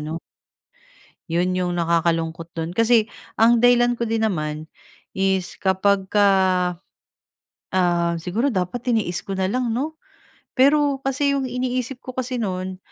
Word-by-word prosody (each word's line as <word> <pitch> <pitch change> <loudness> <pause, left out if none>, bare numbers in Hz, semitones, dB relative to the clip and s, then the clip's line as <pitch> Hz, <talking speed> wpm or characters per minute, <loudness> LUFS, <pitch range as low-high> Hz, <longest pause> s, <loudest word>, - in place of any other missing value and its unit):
'no. 155 +2 -4 1.1
'Yon 175 +2 0
'yong 180 -1 -1
nakakalungkot 165 0 -1
dun 165 0 -3
kasi 230 +1 +3 0.3
ang 230 +1 +5
dahilan 245 0 +4
ko 235 - -1
din 225 0 -1
naman 155 -3 -4 0.5
is 190 -1 0
kapag 190 0 +1
ka, 205 -1 +4 1.5
ah 175 -2 +2
siguro 205 +11 -1
dapat 195 +3 -2
tiniis 215 -7 0
ko 195 -1 -5
na 190 0 0
lang, 250 +1 -1
'no? 305 +5 -4 0.5
Pero 280 +1 +3
kasi 280 +1 0
'yong 265 -2 -1
iniisip 250 +1 -2
ko 255 - -7
kasi 255 0 -3
no'n, 185 -3 -3
200 Hz, 135 wpm, -22 LUFS, 175-245 Hz, 1.5 s, ang